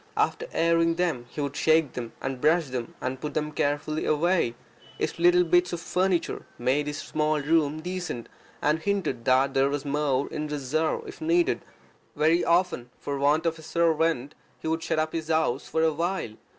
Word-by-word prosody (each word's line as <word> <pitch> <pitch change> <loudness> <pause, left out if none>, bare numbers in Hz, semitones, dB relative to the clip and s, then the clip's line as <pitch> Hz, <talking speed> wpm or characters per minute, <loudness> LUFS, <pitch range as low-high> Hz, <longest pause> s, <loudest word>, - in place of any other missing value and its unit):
After 485 - 0
airing 165 0 +2
them 165 -9 -1
he 150 - -5
would 140 -1 -3
shake 160 -4 +3
them, 120 -2 -6
and 135 -1 -4
brush 160 -1 +3
them, 125 -2 -5
and 130 0 -3
put 150 -1 -5
them 150 0 0
on - - -13
the 145 +2 -1
rock. 155 -5 +2 0.4
His - - -3
little 175 +1 +5
bits 175 +1 +2
of 175 - -2
furniture 180 +1 0
made 135 +4 +1
his 145 0 -3
small 155 0 0
room 155 0 +1
decent, 175 -8 -4 0.4
and 150 +2 +2
hinted 175 -10 -1
that 130 +1 +3
there 135 0 +3
was 145 0 -3
more 140 -1 0
in 150 0 -3
reserve 150 +2 -1
if - - -10
needed. 340 +2 +2 0.5
Very 165 +3 +3
often, 170 -8 +1
for 140 -1 -4
want 150 +4 +3
of 165 -1 0
a - - -10
servant, 160 -4 +1 0.3
he - - -6
would 160 +1 0
shut - - -1
up 155 0 0
his 160 -2 -3
house 155 -5 +1
for 160 - 0
a 160 -1 +3
while. 170 - -2
155 Hz, 190 wpm, -26 LUFS, 140-170 Hz, 0.5 s, little